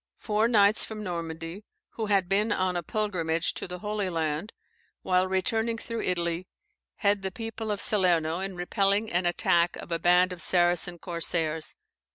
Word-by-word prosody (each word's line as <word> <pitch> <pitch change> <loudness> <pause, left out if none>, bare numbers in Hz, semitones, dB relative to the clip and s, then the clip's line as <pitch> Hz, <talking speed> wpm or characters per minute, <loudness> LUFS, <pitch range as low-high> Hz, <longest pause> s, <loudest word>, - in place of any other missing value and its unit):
Four 215 +1 +1
knights 210 -2 +4
from 215 -1 -5
Normandy, 165 +1 -5 0.3
who 220 -2 -4
had 195 -3 +2
been 205 +4 +1
on 185 -2 0
a 175 - 0
pilgrimage 170 -4 -1
to - - -6
the 180 0 -6
Holy 210 -2 -1
Land, 160 +3 -2 0.5
while 185 0 +2
returning 220 +5 0
through 230 0 -5
Italy, 170 0 -1 0.5
head 205 -1 +1
the 190 - -2
people 225 +2 -6
of 205 -1 -1
Salerno 175 -5 +2
in 190 0 -4
repelling 200 +4 +1
an 175 +1 +1
attack 175 0 +2
of - - -10
a 165 - 0
band 180 +1 +4
of 175 - -8
Saracen 175 0 +2
corsairs. 165 -2 -1
185 Hz, 165 wpm, -27 LUFS, 170-210 Hz, 0.5 s, knights